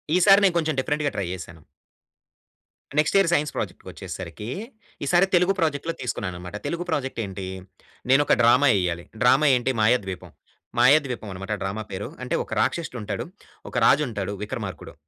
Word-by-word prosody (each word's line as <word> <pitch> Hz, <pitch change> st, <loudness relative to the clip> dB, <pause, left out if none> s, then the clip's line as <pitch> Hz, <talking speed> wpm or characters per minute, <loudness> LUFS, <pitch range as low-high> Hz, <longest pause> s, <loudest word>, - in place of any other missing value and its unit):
ఈసారి 195 Hz, +2 st, +7 dB
నేను 185 Hz, -3 st, +4 dB
కొంచెం 160 Hz, -3 st, 0 dB
డిఫరెంట్‌గా 145 Hz, +2 st, -1 dB
ట్రై 100 Hz, -, -1 dB
జేశాను. 85 Hz, -3 st, -8 dB, 1.4 s
నెక్స్ట్ 150 Hz, -, +2 dB
ఇయర్ 195 Hz, -4 st, +4 dB
సైన్స్ 150 Hz, -3 st, +1 dB
ప్రాజెక్ట్‌కొచ్చేసరికి 95 Hz, +3 st, -6 dB, 0.6 s
ఈసారి 175 Hz, +5 st, +4 dB
తెలుగు 180 Hz, +2 st, +4 dB
ప్రాజెక్ట్‌లో 160 Hz, 0 st, 0 dB
తీసుకున్నాననమాట. 90 Hz, -6 st, -4 dB
తెలుగు 170 Hz, +1 st, -2 dB
ప్రాజెక్ట్ 135 Hz, -6 st, -2 dB
ఏంటి? 95 Hz, -1 st, -6 dB, 0.7 s
నేను 135 Hz, -, +6 dB
ఒక -, -, +3 dB
డ్రామా 125 Hz, +5 st, +5 dB
ఎయ్యాలి. 85 Hz, -2 st, -2 dB, 0.2 s
డ్రామా 130 Hz, +4 st, +5 dB
ఏంటి 125 Hz, +2 st, 0 dB
మాయాద్వీపం. 105 Hz, -5 st, 0 dB, 0.5 s
మాయాద్వీపం 130 Hz, -6 st, +3 dB
అనమాట 95 Hz, +3 st, -5 dB
డ్రామా 100 Hz, +3 st, -3 dB
పేరు. 95 Hz, +2 st, -5 dB
అంటే 125 Hz, -, -1 dB
ఒక -, -, -18 dB
రాక్షసుడు 160 Hz, -7 st, -2 dB
ఉంటాడు. -, -, -4 dB, 0.4 s
ఒక -, -, -13 dB
రాజు 150 Hz, +2 st, +5 dB
ఉంటాడు 100 Hz, -3 st, -4 dB
విక్రమార్కుడు. 105 Hz, -4 st, -6 dB
125 Hz, 145 wpm, -24 LUFS, 95-150 Hz, 1.4 s, ఈసారి